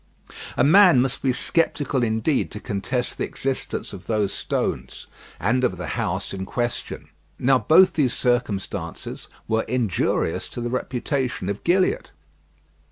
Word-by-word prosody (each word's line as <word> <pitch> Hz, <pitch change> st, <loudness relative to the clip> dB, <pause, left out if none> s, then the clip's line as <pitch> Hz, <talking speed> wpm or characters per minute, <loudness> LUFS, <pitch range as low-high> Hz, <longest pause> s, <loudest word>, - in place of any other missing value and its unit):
A -, -, +4 dB
man 180 Hz, 0 st, +7 dB
must 130 Hz, +1 st, 0 dB
be 135 Hz, -, +2 dB
sceptical 145 Hz, -1 st, 0 dB
indeed 110 Hz, +5 st, +1 dB
to 105 Hz, -, -5 dB
contest 110 Hz, +4 st, -3 dB
the -, -, 0 dB
existence 135 Hz, -4 st, -4 dB
of 95 Hz, -, -10 dB
those 105 Hz, -3 st, 0 dB
stones, -, -, -3 dB, 0.3 s
and 115 Hz, +9 st, +1 dB
of 95 Hz, -7 st, +1 dB
the 90 Hz, -, -5 dB
house -, -, -2 dB
in 95 Hz, -1 st, -4 dB
question. 120 Hz, +4 st, -4 dB, 0.3 s
Now 130 Hz, 0 st, +3 dB
both 185 Hz, +7 st, +6 dB
these 135 Hz, -5 st, +2 dB
circumstances 100 Hz, -8 st, -2 dB, 0.2 s
were 110 Hz, 0 st, +2 dB
injurious 115 Hz, -9 st, 0 dB
to 120 Hz, -, -6 dB
the 120 Hz, 0 st, -3 dB
reputation 125 Hz, -, -2 dB
of 100 Hz, 0 st, -4 dB
Gilliatt. 180 Hz, -, +1 dB
125 Hz, 140 wpm, -23 LUFS, 105-135 Hz, 0.3 s, man